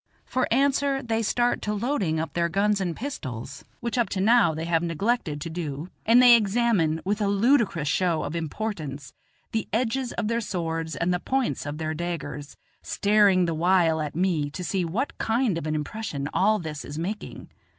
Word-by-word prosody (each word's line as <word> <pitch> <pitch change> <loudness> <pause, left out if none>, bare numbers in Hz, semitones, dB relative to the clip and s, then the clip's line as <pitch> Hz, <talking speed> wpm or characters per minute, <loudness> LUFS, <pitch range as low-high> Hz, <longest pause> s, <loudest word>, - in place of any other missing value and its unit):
For 255 - 0
answer 275 +1 +2
they 225 -1 0
start 240 +3 +1
to 210 0 -2
loading 205 - 0
up 160 - -4
their 170 0 +1
guns 200 +3 +1
and 175 -3 -2
pistols, 130 - -6 0.2
which 235 +1 -2
up 235 - +1
to 190 - -3
now 210 -5 +4
they 160 +1 -4
have 165 -1 +1
neglected 170 -1 -1
to 165 - -4
do; 160 -1 -5 0.2
and 230 +2 +7
they 245 -1 +9
examine, 205 -7 +2
with 205 +2 -1
a 205 - +2
ludicrous 200 - +2
show 175 0 +1
of 150 - -4
importance, 160 -4 -4 0.4
the 220 -2 -2
edges 240 +3 0
of 215 - -2
their 230 +1 0
swords 165 - -3
and 170 +4 0
the 180 - 0
points 260 - -1
of 145 +1 -4
their 155 0 -2
daggers, 155 -3 -5 0.2
staring 200 -3 +3
the 165 - -1
while 165 -1 +3
at 150 -1 -4
me 170 -5 +1
to 180 +5 -6
see 185 +1 -1
what 205 - -2
kind 225 -3 +1
of 165 -2 -4
an 155 - -1
impression 150 -2 -4
all 215 +3 +3
this 155 -6 -6
is 145 - -7
making. 195 +6 -5
185 Hz, 190 wpm, -25 LUFS, 160-225 Hz, 0.4 s, they